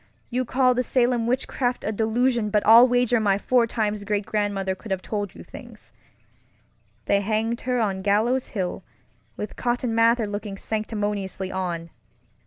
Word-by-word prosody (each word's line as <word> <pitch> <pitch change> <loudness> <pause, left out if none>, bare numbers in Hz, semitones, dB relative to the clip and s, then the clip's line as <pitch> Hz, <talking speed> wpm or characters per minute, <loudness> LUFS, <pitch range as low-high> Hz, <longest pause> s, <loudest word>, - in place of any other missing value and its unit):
You 255 +1 0
call 255 +1 +3
the 250 - 0
Salem 245 -2 +1
witchcraft 250 0 -1
a 215 - -1
delusion, 225 +1 +1
but 210 0 +1
I'll 230 +3 +8
wager 245 -1 +2
my 200 -2 +2
four 240 +3 +2
times 215 -3 -2
great 205 0 -1
grandmother 200 -2 -1
could 210 +4 -11
have 190 -1 -2
told 205 -3 -4
you - - -10
things. - - -13 1.1
They 200 - +2
hanged 220 +3 -1
her 250 -1 +1
on 195 -4 -1
Gallows 220 +6 +1
Hill, 185 0 -2 0.6
with 210 - -6
Cotton 240 -1 -1
Mather 230 0 +3
looking 205 -1 -5
sanctimoniously 205 -3 -3
on. 170 -3 -4
215 Hz, 155 wpm, -24 LUFS, 200-240 Hz, 1.1 s, I'll